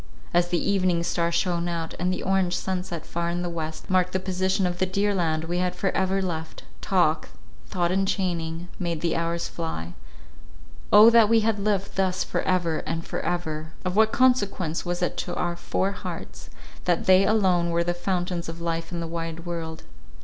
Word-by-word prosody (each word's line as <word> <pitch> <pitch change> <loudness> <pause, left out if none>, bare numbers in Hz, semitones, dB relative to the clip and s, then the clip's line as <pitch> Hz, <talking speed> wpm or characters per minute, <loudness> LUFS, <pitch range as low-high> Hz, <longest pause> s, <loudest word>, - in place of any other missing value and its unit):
As 175 0 +3
the 175 - 0
evening 185 -2 +1
star 170 0 0
shone 170 0 0
out, 165 -2 -3
and 180 +1 +1
the 185 - -3
orange 190 -2 +1
sunset, 180 -3 -3
far 170 0 -2
in 175 +1 -2
the 175 - -3
west, 160 -1 -5
marked 185 -1 +2
the 185 - +1
position 190 +1 0
of 175 0 -2
the 185 - +2
dear 200 +2 +1
land 160 -4 0
we 175 +2 -2
had 180 0 0
for 195 - 0
ever 190 +1 +1
left, 160 -3 -4 0.2
talk, 175 -5 +2 0.4
thought 175 -1 0
enchaining, 180 -3 -1
made 170 -3 -2
the 170 - 0
hours 170 0 -1
fly—O 80 - 0
that 230 -2 +6
we 230 -1 +5
had 215 -1 +1
lived 200 -2 -1
thus 185 -1 +1
for - - -2
ever 175 -4 +1
and 165 +1 -4
for - - -3
ever! 160 -2 -3
Of 180 0 -1
what 220 +1 +5
consequence 200 -10 +2
was 175 0 -2
it 180 - -1
to 175 - -3
our 175 0 -1
four 190 +2 -1
hearts, 200 - -7 0.4
that 175 -2 +1
they 185 0 +6
alone 190 -5 +3
were 170 0 +1
the 175 0 0
fountains 175 -1 -2
of 165 +1 -7
life 165 0 -3
in 170 -1 -3
the - - -3
wide 165 0 -5
world? 165 -2 -5
175 Hz, 190 wpm, -25 LUFS, 165-190 Hz, 0.4 s, that